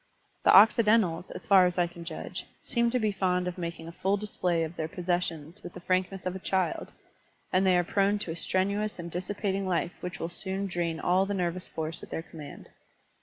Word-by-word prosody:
The - - +6
Occidentals, 210 -4 +5
as - - -8
far 190 -2 +7
as 180 - -3
I 175 - +4
can 170 0 -9
judge, 165 -1 -6 0.2
seem 235 -1 +1
to 250 - +1
be 215 -3 +1
fond 180 -2 0
of 180 0 -4
making 170 -1 -5
a - - -6
full 195 +4 0
display 180 -5 -1
of 160 +1 -5
their 160 - -2
possessions 175 -1 -2
with - - -9
the - - -6
frankness 185 +1 -1
of 185 0 -2
a - - -5
child; 185 -2 -1 0.6
and 190 +1 +4
they 180 -1 +5
are 175 - +3
prone 200 +3 +2
to 165 - -4
a - - -4
strenuous 200 +4 0
and 170 -1 -7
dissipating 195 +2 -2
life 175 -1 0
which 180 0 -5
will 165 - -2
soon 190 +2 -2
drain 170 -3 -2
all 185 +3 +2
the 205 - -1
nervous 180 -1 -2
force 160 +1 -4
at - - -10
their 160 - -4
command. 155 -3 -11
180 Hz, 215 wpm, -29 LUFS, 170-195 Hz, 0.6 s, far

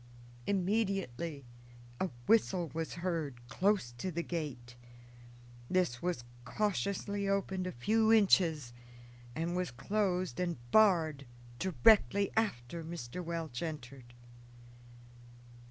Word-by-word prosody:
Immediately 190 - -1 0.5
a 185 - 0 0.2
whistle 185 -7 +3
was 165 0 -3
heard 160 -9 -3
close 190 -3 +1
to 185 - -2
the 170 +1 -2
gate. 135 -9 -5 0.9
This 180 -10 +1
was 175 -9 -2 0.2
cautiously 200 - -1
opened 190 -2 0
a - - -3
few 220 - +2
inches, 170 - +4 0.6
and 170 +4 -2
was 180 -1 -1
closed 185 - -1
and 175 -3 -1
barred 160 - +4 0.3
directly 190 - +4
Mr. 165 - -3
Welch 165 -7 -4
entered. 135 -6 -7
175 Hz, 95 wpm, -33 LUFS, 140-195 Hz, 0.9 s, inches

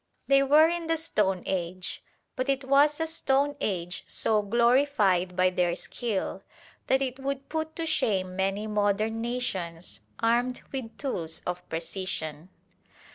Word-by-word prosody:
They 275 0 +5
were 295 +3 +6
in 340 0 -2
the 325 0 +2
Stone 205 - 0
Age, 185 0 -3 0.3
but 255 +2 -2
it 275 0 +1
was 285 +3 +4
a 320 - +1
Stone 285 -3 +1
Age 180 -3 -2
so 215 -1 +2
glorified 220 -5 +3
by 185 0 +3
their 175 -1 +1
skill 215 +1 -3 0.5
that 265 +1 +3
it 260 0 -4
would 275 0 -4
put 315 0 -3
to 330 - -2
shame 190 - 0
many 195 +2 0
modern 210 +1 +1
nations 190 -9 -3 0.2
armed 240 +2 +1
with 255 -4 -5
tools 170 - -4
of 180 0 -3
precision. 165 -1 -4
225 Hz, 140 wpm, -28 LUFS, 185-275 Hz, 0.5 s, were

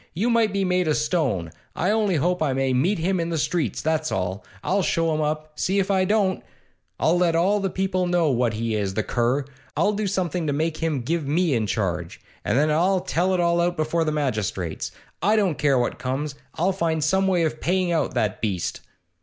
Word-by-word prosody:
You 225 +8 +1
might 230 -3 +3
be 195 -1 0
made 180 -1 +1
o' 155 - +3
stone! 140 - 0 0.2
I 180 +4 +1
only 210 -4 +2
hope 175 +4 +1
I 145 -4 +1
may 135 0 0
meet 165 +12 +2
him 180 +3 0
in 165 0 -1
the 165 - -1
streets, 150 - -1
that's 155 0 0
all! 95 +2 -2 0.2
I'll 195 +2 +1
show 165 -2 +1
him 155 - 0
up, 155 0 -2
see 190 +2 +1
if 195 0 +1
I 190 -1 +3
don't! 200 -2 +1 0.6
I'll 175 +2 +3
let 170 -2 +2
all 190 +5 +3
the 195 -1 -1
people 185 -1 -1
know 175 -4 +2
what 120 -2 +1
he 115 0 -2
is, 100 -3 -1
the 110 - 0
cur! 125 +5 0 0.3
I'll 210 - +3
do 210 0 -1
something 180 -4 -1
to 145 - +1
make 155 +2 -1
him 160 -5 -1
give 155 +4 -2
me 165 +1 +2
in 110 -3 0
charge, 90 -6 -2 0.2
and - - +1
then 150 +2 +3
I'll 180 +4 +2
tell 185 +1 0
it - - 0
all 170 0 +2
out 175 +1 0
before 155 +2 +1
the 155 - 0
magistrates. 105 - -2 0.3
I 205 +6 +3
don't 190 -9 +1
care 140 -2 +3
what 120 - -1
comes, 135 +3 -2 0.2
I'll 180 +4 +1
find 165 -4 0
some 190 +5 +2
way 180 -3 +2
of 155 -1 -2
paying 180 0 +1
out 160 -6 0
that 110 -5 0
beast! 95 -6 -2
160 Hz, 220 wpm, -24 LUFS, 135-185 Hz, 0.6 s, might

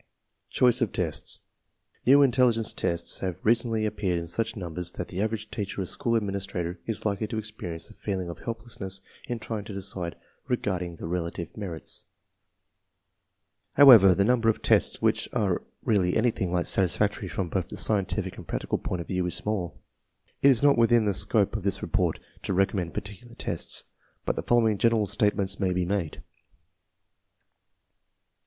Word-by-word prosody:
Choice 125 0 +3
of 115 -6 +1
tests. - - -1 0.7
New 140 +2 +7
intelligence 120 -4 +3
tests 85 0 -1
have 90 -3 -3
recently 115 -1 +2
appeared 100 -4 -1
in 85 - -3
such 110 +7 0
numbers 90 -3 -3
that - - -5
the 95 +1 -3
average 110 0 -3
teacher 100 -1 -4
or 95 - -1
school 115 +6 -1
administrator 95 -4 -2
is 115 -2 -2
likely 105 +1 0
to 110 - -4
experience 95 -6 -4
a 110 - -14
feeling 95 -4 -4
of 85 - -7
helplessness 105 -5 -4 0.3
in 120 -3 -2
trying 110 -2 -5
to 100 - -7
decide 90 -3 -5 0.3
regarding 90 -8 -2
their - - -8
relative 85 -1 -4
merits. 90 -7 -4 1.7
However, 115 -10 +9
the 100 - +3
number 115 -1 +3
of 110 - -1
tests - - +3
which - - +1
are - - 0 0.2
really 95 -5 +2
anything 110 -6 0
like 90 -1 0
satisfactory 100 +2 +1
from 90 -1 -3
both 95 -1 -2
the - - -8
scientific 100 -4 0
and - - -10
practical - - -2
point 90 - -3
of - - -9
view 90 -1 -1
is 90 - +1
small. 100 -5 -3 0.6
It 140 - +7
is 130 -1 +4
not 140 -4 +5
within 115 -1 +4
the 100 - +1
scope 100 +1 +2
of - - -2
this 100 0 -1
report - - 0 0.2
to 95 - -2
recommend 95 -3 0
particular 105 +4 -7
tests, - - -1 0.4
but - - 0
the - - -2
following 115 -4 +2
general 115 -2 +3
statements 100 -1 0
may 95 -2 +1
be 90 0 0
made: 90 -4 -1
1. - - -14
100 Hz, 165 wpm, -27 LUFS, 90-115 Hz, 1.7 s, However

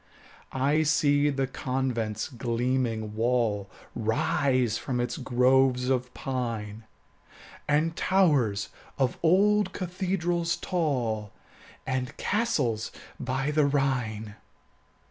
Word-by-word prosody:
I 140 +4 +2
see 145 -1 +3
the 135 -1 0
convent's 125 -5 -2
gleaming 120 -3 -1
wall 110 -3 0 0.3
Rise 125 0 +1
from 125 -2 -2
its 120 - -1
groves 130 -1 +3
of 125 -1 0
pine, 115 -5 -4 0.8
And 155 +3 +2
towers 145 - +2 0.3
of 130 -2 0
old 195 +3 +3
cathedrals 175 -2 -1
tall, 120 - -1 0.5
And 130 +2 -3
castles 150 - 0 0.3
by 135 +3 -1
the 150 -1 +3
Rhine. 125 -7 -1
130 Hz, 90 wpm, -27 LUFS, 115-150 Hz, 0.8 s, see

